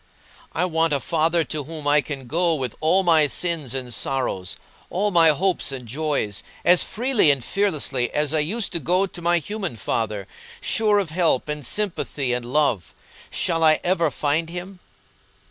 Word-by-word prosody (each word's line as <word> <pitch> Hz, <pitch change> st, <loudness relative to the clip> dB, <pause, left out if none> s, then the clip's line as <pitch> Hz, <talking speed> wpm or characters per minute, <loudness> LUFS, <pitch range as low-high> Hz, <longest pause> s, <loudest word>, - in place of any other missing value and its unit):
I 180 Hz, -, 0 dB
want 165 Hz, -2 st, +1 dB
a 140 Hz, -, +2 dB
Father 165 Hz, +3 st, +1 dB
to 155 Hz, -2 st, -5 dB
whom 155 Hz, -1 st, -7 dB
I 150 Hz, +1 st, +5 dB
can 140 Hz, -3 st, -7 dB
go 165 Hz, +6 st, +1 dB
with 130 Hz, -6 st, -4 dB
all 180 Hz, +5 st, +3 dB
my 160 Hz, -4 st, +5 dB
sins 155 Hz, -5 st, -1 dB
and 125 Hz, -2 st, -3 dB
sorrows, 120 Hz, -9 st, -2 dB, 0.3 s
all 205 Hz, +3 st, 0 dB
my 165 Hz, -3 st, +6 dB
hopes 175 Hz, 0 st, 0 dB
and 125 Hz, -3 st, -7 dB
joys, 130 Hz, -7 st, -2 dB, 0.2 s
as 180 Hz, 0 st, +6 dB
freely 245 Hz, -, +2 dB
and 140 Hz, -4 st, +1 dB
fearlessly 150 Hz, -11 st, 0 dB
as 150 Hz, 0 st, 0 dB
I 155 Hz, -, +3 dB
used 195 Hz, +8 st, -1 dB
to 170 Hz, -, -1 dB
go 180 Hz, +6 st, +2 dB
to 180 Hz, -2 st, -9 dB
my 175 Hz, +1 st, +2 dB
human 195 Hz, -, -4 dB
father, 105 Hz, -2 st, -3 dB, 0.3 s
sure 215 Hz, -2 st, +1 dB
of 190 Hz, -6 st, -1 dB
help 165 Hz, -6 st, +1 dB
and 150 Hz, -3 st, -4 dB
sympathy 160 Hz, -10 st, -1 dB
and 125 Hz, 0 st, -2 dB
love. 125 Hz, -, 0 dB, 0.3 s
Shall 165 Hz, -1 st, -1 dB
I 155 Hz, -1 st, +5 dB
ever 170 Hz, -3 st, +2 dB
find 150 Hz, +3 st, 0 dB
Him?" 180 Hz, +2 st, -8 dB
155 Hz, 175 wpm, -23 LUFS, 135-175 Hz, 0.3 s, my